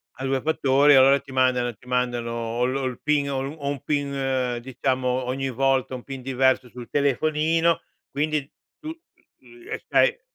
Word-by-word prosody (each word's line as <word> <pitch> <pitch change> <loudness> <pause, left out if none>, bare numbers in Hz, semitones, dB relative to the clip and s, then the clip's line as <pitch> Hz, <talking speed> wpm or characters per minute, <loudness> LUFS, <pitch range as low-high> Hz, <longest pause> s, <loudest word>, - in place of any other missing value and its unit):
a 130 - -7
2 135 -1 0
fattori, 145 -2 +4
allora 135 +1 +6
ti 135 - -14
mandano 125 -2 +1
ti 115 - -23
mandano 125 -2 -1
o 115 +1 -2
lo 135 +1 -2
il 125 -2 -4
PIN 145 -2 +1
o 135 - -2 0.2
o 140 -2 -4
un 140 -2 -4
PIN 135 -4 -1
diciamo, 130 0 -2 0.2
ogni 135 +2 -2
volta, 135 +1 +1
un 125 - -7
PIN 135 -1 -7
diverso 130 0 +1
sul 120 0 -11
telefonino, 155 +4 +1 0.3
quindi 150 -1 -1 0.3
tu. 310 - -7 0.5
eh, 360 +5 -9
sai 485 -1 +3
135 Hz, 160 wpm, -24 LUFS, 125-145 Hz, 0.5 s, allora